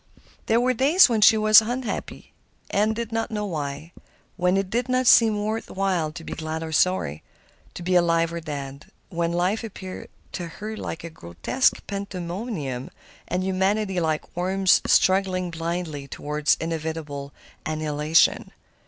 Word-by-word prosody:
There 225 +1 +3
were 255 +1 +2
days 280 +8 +5
when 225 -3 +1
she 220 +2 +7
was 215 0 +7
unhappy, 245 +3 -5 0.4
she 210 +2 +2
did 230 0 -5
not 225 0 -1
know 210 -1 -3
why,—when 170 +3 -4
it 195 -1 -2
did 245 +2 -1
not 255 0 +1
seem 220 -3 +5
worth 220 +1 -3
while 185 -5 -1
to 165 - -9
be - - -6
glad 160 0 -4
or 160 - -6
sorry, 155 - +1 0.5
to 175 - -7
be 180 +1 0
alive 165 -1 +3
or 170 - -3
dead; 140 -3 -7 0.2
when 170 0 -1
life 180 +6 0
appeared 190 -4 -8 0.2
to 175 -2 -5
her 215 +6 -7
like 170 -5 -6
a 170 - -7
grotesque 85 - -1
pandemonium 180 - -5 0.4
and 180 +1 -1
humanity 190 +1 0
like 160 -2 -2
worms 185 +1 +3
struggling 185 -2 +2
blindly 165 -3 -4
toward 150 +2 -4
inevitable 160 -3 -4 0.3
annihilation. 155 0 +1
180 Hz, 145 wpm, -24 LUFS, 160-210 Hz, 0.5 s, she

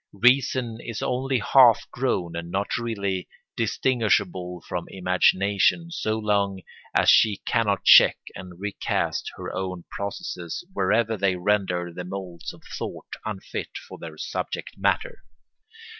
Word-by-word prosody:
Reason 125 0 +2
is 115 -2 -5
only 130 +1 0
half 120 0 +5
grown 90 -10 -1
and 85 0 -5
not 100 +3 -1
really 100 -5 -3 0.3
distinguishable 105 -7 0
from 90 -2 -3
imagination 95 - +2
so 110 -9 -1
long 100 -3 0 0.3
as - - +2
she 105 -3 +5
cannot 105 -5 +1
check - - +8 0.2
and 90 -2 -10
recast 100 0 -2
her - - -6
own 90 -2 -4
processes 95 - -5
wherever 110 - +1
they 95 -1 +1
render 90 -2 0
the 90 - -6
moulds 90 -2 -6
of - - -17 0.2
thought - - -6 0.2
unfit 105 -3 -5
for - - -11
their 80 -2 -9
subject - - -4
matter. - - 0
100 Hz, 130 wpm, -25 LUFS, 90-115 Hz, 0.3 s, check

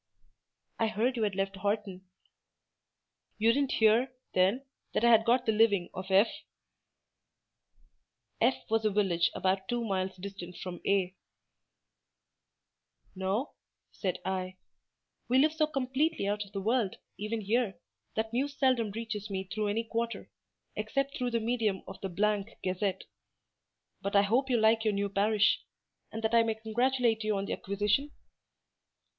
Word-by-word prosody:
"I 225 - +3
heard 225 +4 0
you 235 - -2
had 205 -3 0
left 195 0 -2
Horton." 200 -2 -2 1.3
"You 225 +2 +4
didn't 275 0 +1
hear, 225 +4 +4 0.2
then, 195 +9 +2 0.3
that - - +1
I 235 - +6
had 225 -1 +6
got 245 +1 +3
the 220 - +3
living 210 -5 +3
of 185 +1 -6
F——?" 195 +4 +6 2.1
F—— 250 +3 +2
was 225 0 +1
a 215 - +3
village 190 -5 +2
about 190 +1 0
two 240 -1 -1
miles 190 -2 -1
distant 180 -2 -8
from 180 -2 -6
A——. 190 -2 +1 2.0
"No," 190 +8 -1 0.4
said 185 -3 -2
I; 185 0 -3 0.7
"we 250 - +3
live 300 +3 +4
so 310 -1 +2
completely 275 -1 0
out 205 0 -1
of 200 - -18
the 200 -1 -4
world, 220 -1 +1 0.2
even 215 +2 -2
here, 210 -3 0 0.4
that 220 +1 -2
news 280 +3 -1
seldom 255 -5 +2
reaches 215 0 -5
me 190 -1 -2
through 205 +3 -3
any 215 +3 0
quarter; 230 +1 -3 0.4
except 275 +6 -1
through 250 -1 -1
the 235 -1 0
medium 220 -4 0
of - - -9
the 195 - -3 0.5
—— - - -43
Gazette. 190 +1 -1 1.0
But 200 0 -3
I 200 - +7
hope 250 +7 +1
you 245 - +3
like 220 0 +4
your 215 -2 +1
new 200 0 0
parish; 205 +1 +2 0.5
and 225 +1 -6
that 220 +1 0
I 230 - +7
may 225 -1 0
congratulate 230 +1 +1
you 215 -1 0
on 195 - -2
the - - -3
acquisition?" 210 +8 0
215 Hz, 150 wpm, -30 LUFS, 195-235 Hz, 2.1 s, I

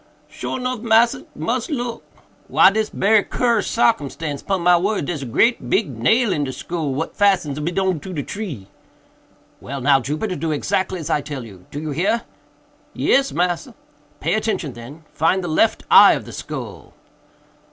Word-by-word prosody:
"Sure - - -5
nuff, 250 -1 -2
massa; 230 +1 +2
mus 240 +3 -2
look. 245 -5 -3 0.4
Why - - +6
dis 215 +1 -1
berry 210 +2 +3
curous 240 -2 0
sarcumstance, 150 - 0
pon 195 -2 -1
my 175 +1 +5
word—dare's 175 -5 -1
a 135 - -5
great 230 - +1
big 195 -7 +1
nail 205 - +2
in 150 -4 -1
de 135 - -3
skull, 155 -1 -4
what 160 +4 -4
fastens 185 -8 +2
ob 150 - -3
it 175 - -3
on 190 -4 +1
to 185 +6 -9
de 150 -5 -3
tree." 175 - -6 0.9
"Well 140 +2 -6
now, 135 +1 +4
Jupiter, 155 - -3
do 160 +1 -2
exactly 185 +5 -1
as 155 - -4
I 150 - +2
tell 140 -4 -6
you—do 100 +6 -10
you 155 0 -4
hear?" 205 +10 0 0.7
"Yes, 275 0 +2
massa." 180 +7 -1 0.4
"Pay - - 0
attention, 215 - -1
then—find 155 +8 -2
the - - -3
left 175 +7 +1
eye - - +9
of - - -4
the - - -10
skull." - - -8
175 Hz, 170 wpm, -20 LUFS, 145-220 Hz, 0.9 s, eye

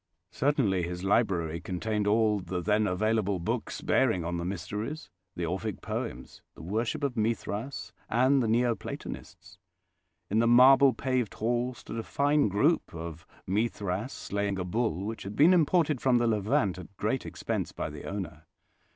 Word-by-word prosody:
Certainly 130 -10 +1
his 90 +1 -4
library 90 -6 +1
contained 105 +3 -2
all 105 0 +3
the 90 0 -4
then 105 +3 +2
available 105 +1 +1
books 85 - -3
bearing 110 -10 +2
on 85 +1 -2
the 85 - -3
Mysteries, 105 - -5 0.2
the 85 - -2
Orphic 95 +4 -3
poems, 65 +2 -5
the - - -11
worship 115 - -2
of 140 -3 0
Mithras, 115 +3 -2 0.2
and 130 +4 +3
the 115 - 0
Neo 120 +2 +3
Platonists. 95 -4 -8 0.7
In 105 +5 +1
the 115 - +3
marble 130 +3 +7
paved 130 -5 -1
hall 120 +2 -1
stood 115 - -7
a - - -3
fine 145 0 +2
group 105 - +1
of 85 +1 -7 0.2
Mithras 105 +2 -1
slaying 100 -1 -2
a 90 - -2
bull, 100 -2 -1
which 110 +1 -5
had 100 +2 -6
been 160 +6 +6
imported 160 -4 +3
from 130 -2 +4
the 120 - +2
Levant 105 -3 +1
at 90 +2 -12
great 115 +5 -1
expense - - -3
by - - -4
the - - -9
owner. 85 -6 -6
105 Hz, 160 wpm, -29 LUFS, 95-120 Hz, 0.7 s, marble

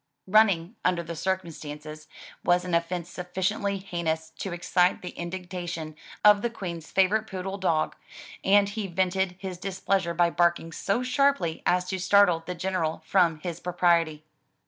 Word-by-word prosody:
Running, 195 -2 +3
under 180 -2 +1
the 170 0 -6
circumstances, 155 -4 -5 0.4
was 180 +1 +3
an 180 - -4
offence 170 +1 0
sufficiently 190 +3 -2
heinous 165 -4 -3
to 195 - -4
excite 180 +1 +1
the 180 - -5
indignation 175 -3 -5 0.3
of 210 -1 +7
the 235 - 0
Queen's 175 -8 -6
favorite 210 +3 +2
poodle 190 +1 -5
dog, 160 -5 +1 0.5
and 200 +1 +5
he 205 -1 -4
vented 185 0 0
his 185 -2 -6
displeasure 190 -2 -1
by 170 0 +3
barking 170 -1 +1
so 200 +8 -1
sharply 265 - +1
as 180 0 +2
to 190 -1 -2
startle 185 -3 +4
the 180 - -3
General 170 -3 -2
from 170 -5 +2
his 170 -1 -5
propriety. 170 -3 +1
180 Hz, 145 wpm, -27 LUFS, 170-195 Hz, 0.5 s, of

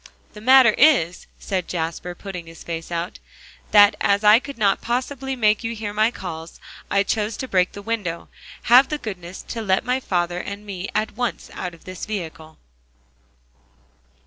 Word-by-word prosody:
"The 210 - -11
matter 255 0 +7
is," 250 - +4
said 185 -3 -3
Jasper, 170 +1 -4
putting 180 -3 -8
his 165 0 -12
face 165 0 -6
out, 170 +2 -4 0.5
"that 205 0 +7
as 200 +1 +2
I 210 +2 +7
could 275 0 -9
not 200 -3 +2
possibly 265 +2 -2
make 215 -2 +2
you 230 0 -3
hear 210 -2 -5
my 215 +2 +3
calls, 165 -7 -8 0.3
I 200 0 +3
chose 215 +1 -1
to 260 - -4
break 185 -5 +1
the 200 - -9
window. 200 -7 -3 0.4
Have 250 +3 +6
the 300 - -1
goodness 185 -7 -7
to 230 - -4
let 190 -3 +1
my 250 +1 +1
father 175 -6 -1
and 200 +2 -7
me 195 -2 -5
at 215 +1 0
once 245 -1 -3
out 180 -2 -5
of 165 - -21
this 185 -1 -7
vehicle." 160 -6 -6
205 Hz, 170 wpm, -22 LUFS, 180-230 Hz, 0.5 s, matter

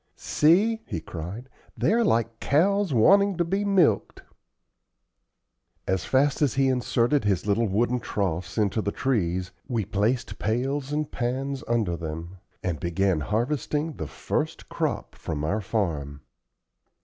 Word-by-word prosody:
"See," 205 +9 +3
he 100 -9 -3
cried, 90 +10 -7 0.3
"they - - +2
are 235 +1 +3
like 115 - +1
cows 195 +5 +2
wanting 195 - +5
to 175 - +1
be 195 +4 0
milked." 185 - +2 1.6
As 95 0 0
fast 140 +3 +2
as 145 -4 +2
he 135 0 +3
inserted 125 +1 +1
his 100 -3 +1
little 110 +2 +2
wooden 120 +5 +1
troughs 95 -4 -3
into 105 0 +1
the 100 - -1
trees, 95 -9 -1 0.2
we 115 -6 -1
placed 110 +5 -1
pails 130 +5 -1
and 150 0 -2
pans 130 +3 -2
under 110 -7 +1
them, 85 +2 -6 0.3
and 85 -4 -2
began 90 0 +1
harvesting 145 - -1
the 80 - -4
first - - -3
crop - - -2
from 75 -3 -5
our 100 +8 0
farm. 80 -9 -2
115 Hz, 135 wpm, -26 LUFS, 95-145 Hz, 1.6 s, wanting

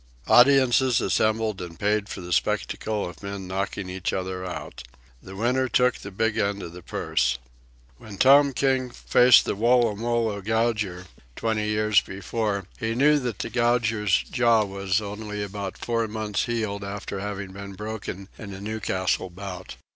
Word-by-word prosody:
Audiences 130 -1 +5
assembled 110 -2 0
and 85 -2 -8
paid 105 0 0
for 95 - -6
the 90 0 -4
spectacle 105 +3 -1
of 90 - -11
men 100 -1 -6
knocking 95 +1 -3
each 90 0 -3
other 95 -1 -3
out. 90 - -6 0.4
The 95 - -11
winner 125 +5 +1
took 125 -1 +3
the 100 - -8
big 110 +3 -1
end 100 -1 -1
of 85 - -8
the 90 - -10
purse. 60 -6 0 0.6
When 105 -2 -10
Tom 140 +4 +6
King 130 -1 +1
faced 125 0 +5
the - - -1
Woolloomoolloo 115 -2 +1
Gouger, 105 -4 0 0.3
twenty 110 -2 -1
years 105 0 +3
before, 100 0 -3
he 115 0 -2
knew 145 +4 +4
that 120 -6 -3
the - - -5
Gouger's 115 -5 +2
jaw 115 -3 +4
was 100 0 -1
only 105 0 -5 0.3
four 115 -1 -2
months 105 -1 -2
healed 110 -4 -2
after 100 0 -5
having 100 -1 -5
been 100 +1 -8
broken 105 -2 -6
in 100 -3 -7
a - - -9
Newcastle 100 -3 -1
bout. 95 0 -8
105 Hz, 155 wpm, -25 LUFS, 100-115 Hz, 0.6 s, Tom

